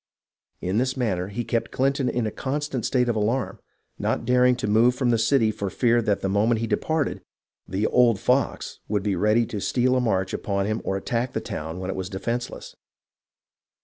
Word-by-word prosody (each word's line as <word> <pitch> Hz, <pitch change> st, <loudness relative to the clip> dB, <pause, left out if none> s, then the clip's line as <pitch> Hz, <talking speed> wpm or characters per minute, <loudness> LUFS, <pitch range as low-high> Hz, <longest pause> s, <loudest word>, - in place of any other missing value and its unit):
In 95 Hz, +4 st, 0 dB
this 130 Hz, +1 st, -1 dB
manner 95 Hz, -8 st, -1 dB
he 115 Hz, +4 st, -4 dB
kept 115 Hz, -1 st, -1 dB
Clinton 135 Hz, 0 st, +1 dB
in 120 Hz, -2 st, -1 dB
a 110 Hz, -, -2 dB
constant 140 Hz, -1 st, -2 dB
state 125 Hz, -2 st, +1 dB
of 120 Hz, -, +1 dB
alarm, 110 Hz, +4 st, -1 dB, 0.4 s
not -, -, -1 dB
daring 125 Hz, 0 st, +4 dB
to 120 Hz, -, -4 dB
move 115 Hz, +4 st, +4 dB
from 125 Hz, -1 st, +1 dB
the 115 Hz, -, +2 dB
city 115 Hz, -1 st, +3 dB
for 100 Hz, -2 st, -4 dB
fear 120 Hz, +4 st, +2 dB
that 105 Hz, -3 st, 0 dB
the -, -, -1 dB
moment 110 Hz, +4 st, +2 dB
he 115 Hz, -, -1 dB
departed, 145 Hz, +6 st, -1 dB, 0.5 s
"the 95 Hz, +4 st, -1 dB
old 120 Hz, -4 st, +4 dB
fox" -, -, 0 dB
would 105 Hz, -2 st, -1 dB
be 100 Hz, -2 st, 0 dB
ready 105 Hz, +5 st, +3 dB
to 105 Hz, -2 st, -5 dB
steal 125 Hz, +4 st, +1 dB
a 130 Hz, -, +2 dB
march 95 Hz, -5 st, 0 dB
upon 100 Hz, -1 st, -1 dB
him 110 Hz, +2 st, -1 dB
or 95 Hz, -, -1 dB
attack 120 Hz, +5 st, -2 dB
the -, -, -1 dB
town 80 Hz, +2 st, -5 dB
when 95 Hz, +1 st, -3 dB
it -, -, -5 dB
was 95 Hz, -1 st, -4 dB
defenceless. 115 Hz, +5 st, -4 dB
115 Hz, 200 wpm, -24 LUFS, 100-125 Hz, 0.5 s, daring